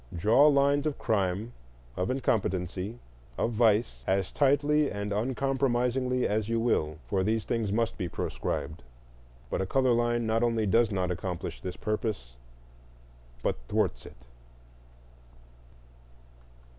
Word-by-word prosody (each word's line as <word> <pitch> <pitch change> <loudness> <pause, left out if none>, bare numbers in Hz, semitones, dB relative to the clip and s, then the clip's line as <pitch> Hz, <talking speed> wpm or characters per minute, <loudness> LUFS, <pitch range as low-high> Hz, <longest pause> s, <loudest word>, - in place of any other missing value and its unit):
Draw 110 - +5
lines 140 0 +3
of 150 - -2
crime, 100 +2 -1 0.4
of 90 - -1
incompetency, 100 -5 -1 0.4
of 115 - 0
vice, 110 0 +2
as 95 0 +1
tightly 145 +1 +2
and 100 0 -3
uncompromisingly 125 +1 0
as 105 +1 -1
you 115 0 +1
will, 80 -10 0
for 95 -2 0
these 110 +2 0
things 115 -4 -1
must 115 +1 -1
be 90 -3 -2
proscribed; 75 0 -4 0.7
but - - 0
a 95 - -2
color 130 +2 +3
line 120 0 +1
not 110 +1 +1
only 115 -2 +1
does 115 +4 +3
not 90 -3 -1
accomplish 90 0 -4
this 90 -1 -6
purpose, 105 - -3 1.1
but - - 0
thwarts - - -1
it. - - -14
115 Hz, 125 wpm, -28 LUFS, 95-125 Hz, 1.1 s, Draw